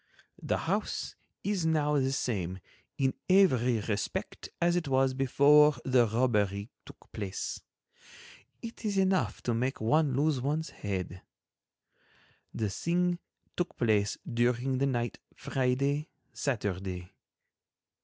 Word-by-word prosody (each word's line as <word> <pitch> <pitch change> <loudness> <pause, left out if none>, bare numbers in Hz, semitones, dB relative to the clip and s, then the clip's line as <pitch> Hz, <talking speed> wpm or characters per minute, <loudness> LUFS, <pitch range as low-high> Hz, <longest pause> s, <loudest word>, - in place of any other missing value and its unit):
The - - 0
house - - -2 0.3
is 200 -3 0
now 150 -2 +2
the 135 0 +1
same 95 -9 -2 0.4
in 135 -1 +1 0.2
every 125 - +4
respect 105 -1 -3
as 175 0 +3
it 175 -4 -1
was 135 -1 +2
before 145 +3 +5
the 125 -3 +4
robbery 105 -3 0 0.2
took - - -15
place. 100 -3 -4 1.0
It 230 +1 -8
is 205 -2 -1
enough 185 - +1
to 120 - 0
make 130 +4 -1
one 145 +4 +2
lose 145 -1 +1
one's 150 +4 -1
head. 90 -3 -4 1.3
The 105 -3 -2
thing 175 - 0 0.4
took 175 - -3
place 105 -3 +2
during 125 +2 +1
the 140 - +2
night 120 -3 -2 0.2
Friday—Saturday. 125 - -2
130 Hz, 115 wpm, -30 LUFS, 110-150 Hz, 1.3 s, before